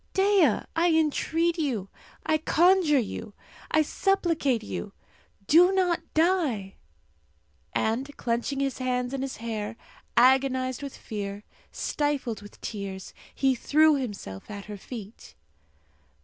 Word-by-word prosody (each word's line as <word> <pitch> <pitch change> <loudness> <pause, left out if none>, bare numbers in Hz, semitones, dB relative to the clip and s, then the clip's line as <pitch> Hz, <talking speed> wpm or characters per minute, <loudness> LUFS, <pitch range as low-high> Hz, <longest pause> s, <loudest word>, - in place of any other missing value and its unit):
Dea, 385 - +4
I 340 +1 +3
entreat 325 +2 +1
you! 235 -11 -1 0.4
I 310 0 +2
conjure 335 -1 +4
you! 220 -2 -3 0.3
I 310 - +3
supplicate 325 - +1
you! 205 -1 -6 0.5
Do 345 - +6
not 365 -3 +1
die!" 310 - +1 1.0
And 235 +6 0
clenching 240 +4 -1
his 275 -1 -1
hands 250 0 -1
in 270 - -2
his 270 -1 -4
hair, 220 -1 -4 0.4
agonized 260 +1 +3
with 280 -2 -7
fear, 205 -1 -6 0.3
stifled 285 -7 -2
with 205 - -14
tears, 195 -3 -6 0.2
he 270 -1 +3
threw 305 +5 +4
himself 205 - -6
at 200 -1 -7
her 210 -1 -7
feet. 215 0 -10
265 Hz, 120 wpm, -27 LUFS, 220-315 Hz, 1.0 s, Do